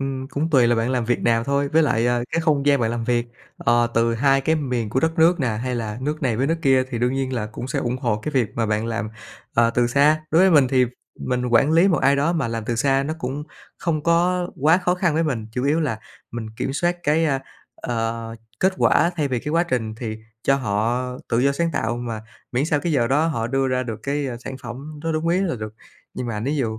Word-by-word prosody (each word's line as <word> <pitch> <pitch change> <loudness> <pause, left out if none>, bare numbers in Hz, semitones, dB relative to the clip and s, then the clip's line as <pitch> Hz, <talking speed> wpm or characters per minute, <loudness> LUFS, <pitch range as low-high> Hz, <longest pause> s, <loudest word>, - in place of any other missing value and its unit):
Ừm, 135 -1 -3
cũng 155 +4 -2
tùy 130 -6 +5
là 120 - +3
bạn 115 +2 0
làm 125 -3 0
việc 120 +1 +1
nào 115 -1 +2
thôi. 140 +1 0
Với 160 +3 +3
lại, 120 -5 +2
à, 120 0 +1
cái 165 - +1
không 150 -4 +1
gian 140 -3 +4
bạn 115 - +1
làm 115 -1 -3
việc, 120 0 0 0.3
ờ, 120 0 +2
từ 115 0 +2
2 135 +3 +3
cái 160 +4 +1
miền 125 -7 -2
của 130 - +1
đất 160 +2 0
nước 170 +1 +4
nè, 135 - +1
hay 120 +3 -2
là 110 -1 -4
nước 150 +4 -3
này 120 -5 +1
với 135 - +1
nước 165 +2 0
kia 135 -1 +4
thì 120 - -3
đương 125 +2 +1
nhiên 135 -1 -2
là 115 -4 -2
cũng 110 +3 -7
sẽ - - -2
ủng 120 +1 -1
hộ 120 -5 0
cái 150 +8 -5
việc 125 -6 +2
mà 115 -1 0
bạn 110 +1 -1
làm, 110 -2 -2 0.5
ờ, 115 0 +4
từ 120 +1 +2
xa. 145 +5 +3
Đối 165 +4 +5
với 190 - +5
mình 145 -6 +5
thì 130 -2 +3 0.3
mình 125 -1 -1
quản 125 +5 +3
lý 170 +4 +5
một 175 - +2
ai 140 +1 +3
đó 150 +5 +1
mà 155 -9 -1
làm 115 -1 -4
từ 120 +1 -2
xa 135 +3 +2
nó 155 +3 -3
cũng 140 +1 -4 0.3
không 160 -4 -1
có 175 +2 +2
quá 160 +5 +5
khó 180 -1 +1
khăn 175 -3 0
với 160 - +2
mình, 125 -9 -2
chủ 125 +2 -2
yếu 150 +4 +2
là 130 -8 -1 0.3
mình 115 -2 -6
kiểm 135 - -2
soát 175 +5 0
cái, 155 +2 +2
a, 135 -4 +1 0.4
ờ, 115 -1 -3 0.3
kết 190 +1 +3
quả 170 - +3
thay 145 -3 0
vì 125 - -1
cái - - -6
quá 170 - +3
trình, 115 -8 -2
thì 110 -1 -5 0.3
cho 135 - +3
họ 120 +1 -1 0.2
tự 115 - +1
do 140 +3 +3
sáng 165 +3 0
tạo 115 +1 -1
mà 120 -2 -4 0.3
miễn 130 +4 +1
sao 150 -2 +1
cái 170 0 -1
giờ 120 -5 +2
đó 145 +6 +2
họ 115 -8 -1
đưa 135 +2 0
ra 130 0 0
được 115 -3 -6
cái, 140 0 -1
a, 120 - -5
sản 130 +2 -7
phẩm 140 +6 -8
nó 165 - -1
đúng 155 +1 -1
ý 180 +2 +2
là 185 -8 0
được. 110 -1 -7 0.4
Nhưng 125 - -4
mà 105 -3 -3
ví 140 +6 -1
dụ 110 -5 -2
130 Hz, 265 wpm, -22 LUFS, 115-150 Hz, 0.5 s, tùy